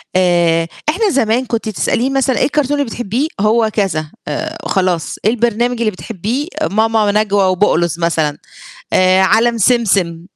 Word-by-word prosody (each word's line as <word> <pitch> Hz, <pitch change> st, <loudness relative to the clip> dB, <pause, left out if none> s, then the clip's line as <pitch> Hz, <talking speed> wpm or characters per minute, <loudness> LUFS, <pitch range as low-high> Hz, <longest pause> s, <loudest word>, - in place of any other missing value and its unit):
آآ، 170 Hz, -2 st, +2 dB, 0.2 s
إحنا 405 Hz, +7 st, +1 dB
زمان 250 Hz, -1 st, +1 dB
كنتِ 225 Hz, -2 st, -3 dB
تسأليني 215 Hz, -, -1 dB
مثلًا 270 Hz, -2 st, 0 dB
إيه -, -, +3 dB
الكرتون 290 Hz, 0 st, 0 dB
اللي 285 Hz, -, +1 dB
بتحبّيه؟ 245 Hz, +6 st, -2 dB
هو 220 Hz, +2 st, +2 dB
كذا 155 Hz, -7 st, -1 dB, 0.2 s
آآ، 320 Hz, +1 st, -4 dB
خلاص 180 Hz, -4 st, -1 dB
إيه 215 Hz, -, +4 dB
البرنامج 240 Hz, +1 st, 0 dB
اللي 225 Hz, -2 st, +1 dB
بتحبّيه؟ 225 Hz, -, -4 dB, 0.2 s
ماما 220 Hz, 0 st, +2 dB
نجوى 205 Hz, -1 st, +1 dB
وبقلظ 175 Hz, -3 st, +1 dB
مثلًا، 160 Hz, -3 st, 0 dB, 0.6 s
آآ 185 Hz, 0 st, +4 dB
عالم 230 Hz, +4 st, +2 dB
سمسم 190 Hz, -7 st, +1 dB
215 Hz, 145 wpm, -15 LUFS, 185-240 Hz, 0.6 s, إيه